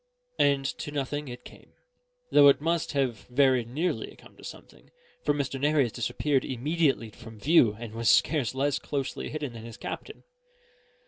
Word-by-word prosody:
And 140 -1 +3
to - - -5
nothing 145 0 -3
it 125 -1 -9
came; - - -15 0.6
though 145 - +7
it 140 - +6
must 165 +1 -1
have 130 -6 -1
very 130 -1 +3
nearly 150 +10 -3
come - - -18
to - - -17
something, - - -12 0.3
for - - +2
Mr. 140 -2 -2
Nares 145 -5 +2
disappeared 140 +3 0
immediately 135 -2 0
from 115 -1 -13
view 125 -5 +4
and 115 -2 -7
was 115 -1 0
scarce 135 -2 +3
less 140 +1 0
closely 140 -2 -4
hidden 150 -5 -5
than 115 -1 -9
his 115 0 -9
captain. - - -7
135 Hz, 160 wpm, -27 LUFS, 120-145 Hz, 0.6 s, though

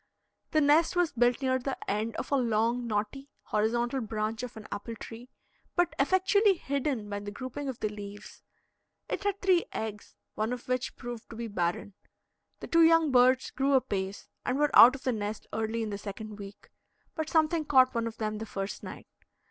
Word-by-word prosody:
The 310 - +2
nest 305 +4 +4
was 355 -2 +2
built 245 +2 +2
near 260 0 +2
the 265 +1 -3
end 215 +3 -1
of - - -5
a - - +4
long, 235 -1 +1
knotty, 220 +6 -3
horizontal 240 +4 0
branch 220 0 -3
of 250 -3 -7
an 215 - -9
apple 225 +3 -5
tree, 230 +2 -10 0.5
but 350 -1 +2
effectually 380 +6 +4
hidden 275 -7 -2
by 205 0 -4
the 205 0 -6
grouping 260 +5 -5
of 255 - -6
the - - +1
leaves; 205 -1 -9 0.7
it - - -3
had 400 -1 0
three 370 -3 +4
eggs, 215 -2 -6 0.2
one 220 +3 -1
of 245 - -7
which 255 0 -2
proved 240 -2 -8
to - - -9
be 230 +1 -4
barren. 180 0 -2 0.7
The - - -6
two 335 - +4
young 325 -2 +5
birds 255 +1 +4
grew 275 +1 +1
apace, 200 -7 -1 0.2
and 250 - -1
were 295 0 +1
out 250 +3 +10
of 275 - -10
the 255 - +1
nest 210 0 -4
early 225 +1 -1
in 215 - -4
the 200 - -4
second 210 +1 -7
week; 200 0 -11 0.4
but 315 -1 -3
something 320 0 +2
caught 260 -3 +4
one 230 -1 -1
of 225 -1 -7
them 215 -1 -3
the 225 - -6
first 195 0 -5
night. - - -9
240 Hz, 195 wpm, -29 LUFS, 215-275 Hz, 0.7 s, out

